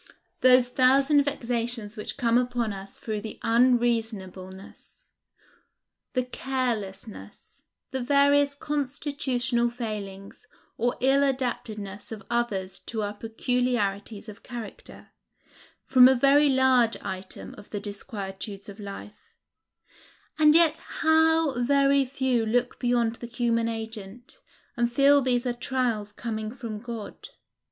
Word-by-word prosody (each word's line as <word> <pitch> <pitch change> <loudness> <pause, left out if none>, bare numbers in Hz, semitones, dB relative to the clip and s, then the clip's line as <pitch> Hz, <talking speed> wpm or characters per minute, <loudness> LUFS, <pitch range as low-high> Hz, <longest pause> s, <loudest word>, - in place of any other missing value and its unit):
Those 255 -1 +6
thousand 270 +3 +4
vexations 235 -5 -2
which 210 - -6
come 230 -1 +2
upon 245 -3 +1
us 195 0 -9
through 215 -2 -4
the 220 0 -7
unreasonableness, 225 - -1 1.0
the 255 -2 +1
carelessness, 235 -6 -5 0.3
the 265 -1 -2
various 280 +2 +3
constitutional 275 -4 -1
failings, 210 -5 -7 0.3
or 240 +2 0
ill 270 +2 +4
adaptedness 225 -7 -3
of 215 -3 -7
others 205 -6 -1
to 220 -2 -4
our 205 0 -3
peculiarities 220 -2 -2
of 210 -2 -10
character, 245 - -9 0.7
form 255 -1 +7
a 265 - +5
very 280 +3 +5
large 260 -3 +3
item 185 0 -6
of - - -14
the 205 - -4
disquietudes 200 -1 -6
of 200 +1 -10
life; 205 +1 -10 1.0
and 305 0 +6
yet 330 -2 +5 0.2
how 320 -4 +3
very 275 +1 +3
few 260 -3 0
look 245 +3 0
beyond 240 -2 +1
the 240 - -7
human 235 -1 0
agent, 225 - -7 0.4
and 240 0 0
feel 280 +3 +5
these 250 -1 +1
are 245 - 0
trials 240 -4 -2
coming 220 -1 -4
from 230 -4 -6
God! 230 -2 -8
240 Hz, 115 wpm, -26 LUFS, 215-260 Hz, 1.0 s, form